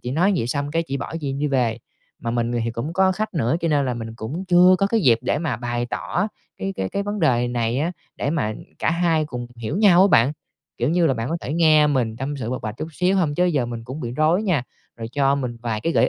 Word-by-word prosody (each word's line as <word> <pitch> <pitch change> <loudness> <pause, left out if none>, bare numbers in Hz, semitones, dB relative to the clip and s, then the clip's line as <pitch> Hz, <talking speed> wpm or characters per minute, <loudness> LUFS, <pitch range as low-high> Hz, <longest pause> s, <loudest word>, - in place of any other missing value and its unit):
chị 125 - -4
nói 180 +8 +2
vậy, 115 - -1
xong 140 +3 -2
cái 165 +1 +1
chị 140 0 -2
bỏ, 150 - -6
chị 140 -2 -2
đi 145 +2 -1
về. 125 -5 +1 0.4
Mà 115 - -3
mình 120 0 -1
thì 115 - -1
cũng 120 +8 -4
có 190 +1 +3
khách 215 0 -3
nữa, 135 +1 +1
cho 165 - 0
nên 145 -3 +2
là 125 - -1
mình 115 -1 -6
cũng 140 +12 -5
chưa 180 +1 +6
có 195 - +3
cái 225 +2 +1
dịp 120 - +4
để 125 - 0
mà 155 -4 -2
bày 120 0 -2
tỏ - - -2 0.3
cái 95 +1 -3
cái 95 0 -2
cái 200 - -2
vấn 205 0 -3
đề 125 -6 +2
này 120 +1 -1
á, 165 +5 0 0.2
để 140 - -1
mà 115 -10 -1 0.2
cả - - +1
hai 165 -2 +2
cùng 125 -4 -6
hiểu 120 +9 -4
nhau 190 -4 +6
á 195 - +5
bạn, 120 +6 +5 0.5
kiểu 120 - +1
như 170 -1 +3
là, 135 - +2
bạn 115 +1 -3
có 165 - 0
thể 135 - -4
nghe 155 -2 +5
mình 125 -6 0
tâm 135 +4 -4
sự, 125 -4 -4
bộc 130 0 -4
bạch 110 0 -5
chút 155 - -4
xíu 180 +4 +1
hông? 160 -6 +1
Chứ 180 - +2
giờ 150 -9 +1
mình 115 -1 -6
cũng 130 +5 -7
bị 120 -3 -4
rối 155 +8 +2
nha, 175 - +1 0.3
rồi 115 -1 -6
cho 140 -1 +2
mình 125 -4 -3
vài 115 -3 -2
cái 165 +8 -1
gợi - - +3
140 Hz, 275 wpm, -22 LUFS, 120-165 Hz, 0.5 s, chưa